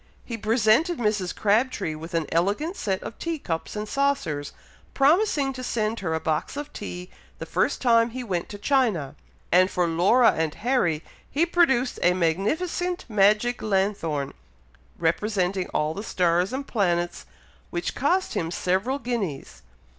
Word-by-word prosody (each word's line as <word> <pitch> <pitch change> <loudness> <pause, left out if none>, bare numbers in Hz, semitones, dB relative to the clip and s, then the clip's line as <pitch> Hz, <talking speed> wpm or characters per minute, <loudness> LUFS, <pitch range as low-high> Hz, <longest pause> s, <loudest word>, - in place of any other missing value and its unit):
He 235 - -4
presented 225 - +2
Mrs. 210 -6 -1
Crabtree 215 -4 +1
with 165 +2 -7
an 165 -2 +1
elegant 205 - 0
set 190 - -2
of 230 - -8
tea 335 -1 -2
cups 165 - -4
and 210 0 -3
saucers, 210 - -1 0.4
promising 285 -1 +3
to 255 -1 -7
send 225 -2 -1
her 160 -4 -1
a - - -1
box 160 - -2
of 290 0 -6
tea 180 -3 -7 0.3
the - - -6
first - - 0
time 230 -1 +4
he 250 +2 -6
went 180 -7 -3
to 205 - -7
China; 205 - +1 0.4
and 185 +2 +5
for 180 -3 +1
Laura 190 +9 +4
and 160 -1 -2
Harry 205 - 0 0.3
he 315 +4 +2
produced 270 -8 +2
a 180 +1 +4
magnificent 315 - -1
magic 215 +3 +3
lanthorn, 190 -8 -1 0.6
representing 185 +2 0
all 150 +1 -1
the 200 - -5
stars 180 -2 +1
and 270 +2 -3
planets, 175 -7 -1 0.4
which 175 0 -3
cost 360 +8 +1
him 165 - -1
several 190 +10 0
guineas. 225 - -4
210 Hz, 150 wpm, -25 LUFS, 175-255 Hz, 0.6 s, and